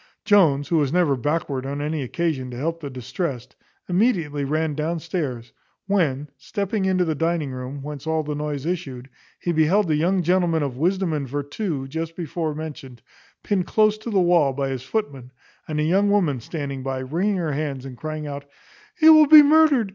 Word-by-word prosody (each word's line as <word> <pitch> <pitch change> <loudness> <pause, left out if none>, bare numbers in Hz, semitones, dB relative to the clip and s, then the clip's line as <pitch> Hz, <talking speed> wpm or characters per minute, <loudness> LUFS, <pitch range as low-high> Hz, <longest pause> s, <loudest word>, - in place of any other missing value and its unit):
Jones, 160 -10 +4
who 170 - +2
was 140 -3 0
never 170 -5 +2
backward 140 0 -2
on 140 +1 -4
any 150 +1 -2
occasion 135 -1 -2
to 120 - -7
help 165 +5 -2
the 145 -3 -6
distressed, 130 - -5 0.3
immediately 175 - +1
ran 155 +2 -1
down 160 +3 -2
stairs; 145 -8 -4 0.3
when 155 -8 0
stepping 200 +5 -2
into 185 -1 +2
the 160 - 0
dining 165 -2 -1
room, 130 +2 -6
whence 145 0 -7
all 160 0 0
the 150 0 -4
noise 150 -1 -4
issued, 135 -8 -4 0.3
he 175 - -2
beheld 170 +5 +3
the 155 - +1
young 180 +4 +1
gentleman 175 -2 +2
of 135 -3 -3
wisdom 180 +4 0
and 140 -4 -3
vertù 145 - -3
just 160 +3 -5
before 160 -2 -3
mentioned, 150 -6 -8 0.4
pinned 190 -4 0
close 215 -1 +3
to 220 - -6
the 205 -4 +2
wall 170 -6 +3
by 135 0 -2
his 130 -2 -4
footman, 135 - -4 0.4
and 155 -1 -2
a - - +1
young 195 +6 +2
woman 175 -10 +2
standing 140 +1 -5
by, 135 0 -3
wringing 170 +10 -1
her 165 -4 -1
hands, 140 -2 -3
and 130 -2 -8
crying 155 +3 -5
out, 140 -1 -6 0.5
"He 315 - +4
will 310 -1 +8
be 305 0 +10
murdered! 290 -7 +4
155 Hz, 190 wpm, -23 LUFS, 140-180 Hz, 0.5 s, be